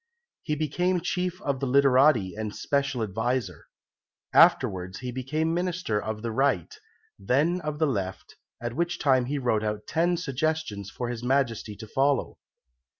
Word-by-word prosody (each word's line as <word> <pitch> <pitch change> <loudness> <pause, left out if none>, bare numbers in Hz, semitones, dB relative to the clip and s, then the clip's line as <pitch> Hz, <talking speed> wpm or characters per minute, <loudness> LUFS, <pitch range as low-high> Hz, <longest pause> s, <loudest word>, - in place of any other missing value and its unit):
He 150 - -2
became 175 +5 0
chief 180 +1 -2
of 140 -2 -1
the 135 - -2
literati 130 - +4
and 110 -1 -4
Special 140 -4 -1
Adviser. 110 -2 -2 0.7
Afterwards 90 0 +4
he 125 -1 -4
became 155 +6 -1
Minister 175 - -1
of 110 0 -5
the 115 - -2
Right, 135 - 0 0.4
then 160 +8 +1
of 150 -1 -3
the 160 - +2
Left, 95 - -3 0.2
at 120 0 -4
which 175 +1 -1
time 130 -4 +3
he 145 +3 -2
wrote 120 -5 0
out 105 0 -3
ten 170 +2 +1
suggestions 145 - -2
for 120 +2 -4
His 120 -1 -4
Majesty 125 -5 0
to 110 +1 -10
follow. 135 +3 0
135 Hz, 150 wpm, -27 LUFS, 110-155 Hz, 0.7 s, literati